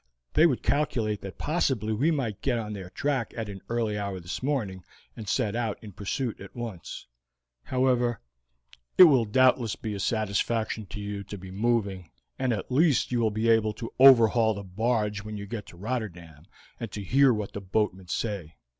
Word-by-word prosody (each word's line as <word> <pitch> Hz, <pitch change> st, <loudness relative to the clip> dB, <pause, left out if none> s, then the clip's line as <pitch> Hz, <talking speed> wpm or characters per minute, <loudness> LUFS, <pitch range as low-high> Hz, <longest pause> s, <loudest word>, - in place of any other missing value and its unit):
They 165 Hz, -, +6 dB
would 135 Hz, -7 st, -1 dB
calculate 115 Hz, -8 st, 0 dB
that 95 Hz, -1 st, -8 dB
possibly 135 Hz, -, 0 dB
we 135 Hz, +10 st, +2 dB
might 130 Hz, -, -2 dB
get 125 Hz, -3 st, +1 dB
on 105 Hz, -2 st, -4 dB
their 95 Hz, -3 st, -7 dB
track 135 Hz, +1 st, -2 dB
at 110 Hz, -2 st, -3 dB
an 95 Hz, -2 st, -8 dB
early 115 Hz, -3 st, -1 dB
hour 100 Hz, -2 st, -3 dB
this 85 Hz, 0 st, -6 dB
morning, 110 Hz, -10 st, -2 dB, 0.3 s
and 110 Hz, -4 st, -7 dB
set 110 Hz, -5 st, 0 dB
out 115 Hz, -3 st, -1 dB
in 105 Hz, -, -9 dB
pursuit 110 Hz, +5 st, -3 dB
at 100 Hz, -, -11 dB
once. 115 Hz, -8 st, -7 dB, 0.6 s
"However, 125 Hz, -2 st, +1 dB, 0.8 s
it -, -, +11 dB
will 135 Hz, -9 st, +6 dB
doubtless 125 Hz, 0 st, +3 dB
be 110 Hz, -2 st, -5 dB
a 100 Hz, -, -5 dB
satisfaction 110 Hz, +1 st, -1 dB
to 95 Hz, +2 st, -7 dB
you 100 Hz, -1 st, -5 dB
to 100 Hz, -, -7 dB
be 95 Hz, 0 st, -10 dB
moving, 100 Hz, -4 st, -1 dB, 0.3 s
and 130 Hz, -1 st, +1 dB
at 110 Hz, +2 st, -3 dB
least 145 Hz, 0 st, +3 dB
you 120 Hz, -, +1 dB
will 115 Hz, -2 st, +3 dB
be 110 Hz, +2 st, -1 dB
able 110 Hz, -2 st, +3 dB
to 115 Hz, +2 st, -7 dB
overhaul 115 Hz, -4 st, +7 dB
the 100 Hz, -, -6 dB
barge 105 Hz, +1 st, -1 dB
when 105 Hz, 0 st, -6 dB
you 100 Hz, -, -6 dB
get 105 Hz, 0 st, -6 dB
to 85 Hz, -, -13 dB
Rotterdam, 85 Hz, -8 st, -5 dB, 0.3 s
and 115 Hz, -4 st, -5 dB
to 105 Hz, -, -5 dB
hear 135 Hz, +6 st, +5 dB
what 105 Hz, -3 st, -3 dB
the 100 Hz, -, -5 dB
boatmen 95 Hz, -1 st, -1 dB
say. 95 Hz, -5 st, -3 dB
110 Hz, 190 wpm, -27 LUFS, 100-120 Hz, 0.8 s, it